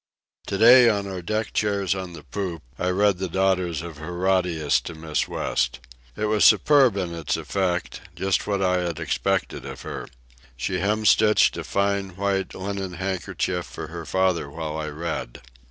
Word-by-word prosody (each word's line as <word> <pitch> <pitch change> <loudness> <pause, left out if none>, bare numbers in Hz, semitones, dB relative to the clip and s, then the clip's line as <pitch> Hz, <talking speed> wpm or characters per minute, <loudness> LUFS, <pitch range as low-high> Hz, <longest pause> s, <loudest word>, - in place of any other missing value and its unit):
To 100 - -2
day, 120 +3 +8
in 100 -2 0
our 95 -2 -5
deck 110 +5 -2
chairs 100 -3 +1
on 95 -2 -6
the 80 -3 -10
poop, 85 +3 -5 0.2
I 90 - 0
read 100 0 +2
The 95 -1 -2
Daughters 90 -3 0
of 85 -3 -8
Herodias 90 -2 +1
to 85 - -6
Miss 80 -2 -2
West. - - -1 0.4
It 110 - -2
was 105 -1 +2
superb 135 -8 +5
in 90 -3 -2
its 85 -3 -2
effect—just 95 +1 -2
what 100 -2 0
I 90 -1 +2
had 85 -2 -3
expected 80 -3 -1
of - - -8
her. - - -6 0.5
She 90 +9 -2
hemstitched 105 +2 +4
a - - -4
fine 100 -2 -1
white 100 0 -1
linen 95 -1 -4
handkerchief 95 -1 -2
for 80 - -8
her 85 -2 -7
father 95 -5 +1
while 80 0 -5
I 80 -1 -3
read. 80 -5 -5
95 Hz, 165 wpm, -24 LUFS, 85-100 Hz, 0.5 s, day